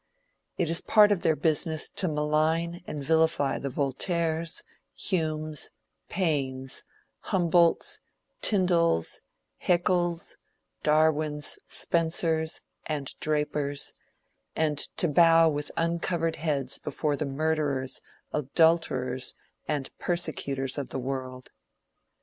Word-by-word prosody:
It 175 - +1
is 170 - +3
a - - -16
part 210 -1 +6
of 195 -4 +2
their 160 - +3
business 155 +1 +1
to 185 - -2
malign 155 +3 0
and 145 -2 -5
vilify 160 -3 +2
the 140 - -3
Voltaires, 160 +5 -1 0.3
Humes, 155 -4 -2 0.4
Paines, 135 -7 -1 0.4
Humboldts, 175 -2 +3 0.4
Tyndals, 175 - +2 0.4
Hæckels, 175 -1 +1 0.4
Darwins, 150 -1 +2
Spencers, 160 -1 +1 0.3
and 145 -3 -3
Drapers, 150 -2 -1 0.6
and 150 -2 +1 0.2
to 175 - +2
bow 165 +1 +6
with 145 -1 -1
uncovered 165 0 0
heads 140 -5 0
before 150 0 -1
the 150 0 -2
murderers, 140 -2 -1 0.3
adulterers, 140 -4 +1 0.3
and 145 -3 -3
persecutors 140 -6 -2
of 140 - -5
the - - -4
world. 130 -1 -5
155 Hz, 100 wpm, -28 LUFS, 140-170 Hz, 0.6 s, part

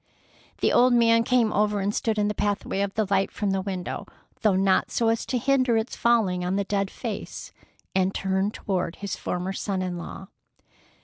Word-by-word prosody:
The - - +3
old 250 0 +5
man 230 -1 +5
came 235 -2 +2
over 210 0 +1
and 200 +1 -1
stood 220 0 -1
in 205 0 +2
the 210 - 0
pathway 205 -1 -1
of 200 +1 -3
light 195 0 +2
from 205 -2 -1
the 190 0 0
window, 185 -2 -4 0.3
though 210 -3 +3
not 190 0 +2
so 230 -1 +1
as 225 0 -1
to 255 - 0
hinder 255 -2 +2
its 220 +2 -2
falling 215 -7 +2
on 180 +2 -1
the 200 - +1
dead 200 0 -1
face, - - -6 0.4
and 190 0 +2
turned 195 +2 -1
toward 185 -4 -2
his 200 -1 -4
former 180 +2 -3
son 190 -1 -2
in 180 -1 -3
law. 190 +2 -8
200 Hz, 190 wpm, -25 LUFS, 190-225 Hz, 0.4 s, old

